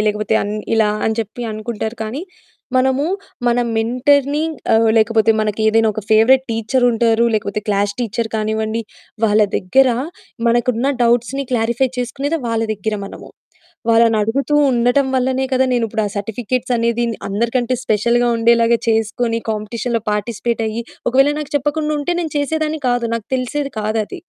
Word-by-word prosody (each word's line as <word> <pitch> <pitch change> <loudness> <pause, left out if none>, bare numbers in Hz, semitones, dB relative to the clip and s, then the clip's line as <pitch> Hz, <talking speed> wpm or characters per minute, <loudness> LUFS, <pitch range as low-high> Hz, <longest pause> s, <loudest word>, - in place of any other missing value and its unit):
ఆహ్, 210 - +1
లేకపోతే 210 0 0
అన్ 205 +1 -3 0.2
ఇలా 220 -1 +3 0.2
అని 220 0 0
చెప్పి 225 +3 -6
అనుకుంటారు. 220 +1 -4
కానీ 245 +9 -4 0.5
మనము 265 +3 +2 0.4
మన 240 +1 +2 0.2
మెంటర్‌ని 280 +6 +2 1.0
మనకి 215 0 -2
ఏదైనా 225 0 +3
ఒక 215 - -4
ఫేవరెట్ 255 +5 +5
టీచరుంటారు, 230 0 +2
లేకపోతే 210 0 -2
క్లాస్ 205 0 +1
టీచరు 230 -1 -2
కానివ్వండి 220 +1 -1 0.4
వాళ్ళ 215 0 +3 0.2
దగ్గర 265 +9 +3 0.6
మనకున్న 240 +2 +1
డౌట్స్‌ని 240 +4 +1
క్లారిఫై 235 +3 +1
చేసుకునేది 280 +6 -2
వాళ్ళ 225 0 0
దగ్గర 210 +2 -3
మనము. - - -11 0.6
వాళ్ళనడుగుతూ 230 +5 +2 0.2
ఉండటం 245 +3 +2
వల్లనే 260 +1 0
కదా! 260 - +3
నేను 235 -2 +1
ఇప్పుడు 220 0 -1
ఆ - - -2
సర్టిఫికేట్సనేదిన్ 235 +2 -1
అందరికంటే 235 +4 0
స్పెషల్‌గా 235 +3 +2
ఉండేలాగా 235 0 +4
చేసుకొని 225 +1 0
కాంపిటీషన్‌లో 225 +2 -2
పార్టిసిపేటయ్యి, 225 +1 -2 0.3
ఒకవేళ 270 +3 +4
నాకు 295 -1 -7
చెప్పకుండా 300 +2 -1
ఉంటే 350 +4 -1
నేను 320 -3 -4
చేసేదాన్ని 310 +1 -1
కాదు. 245 -1 0
నాకు 230 -2 -5
తెలిసేది 275 +3 -3
కాదది. 215 - -2
235 Hz, 130 wpm, -18 LUFS, 220-260 Hz, 1.0 s, ఫేవరెట్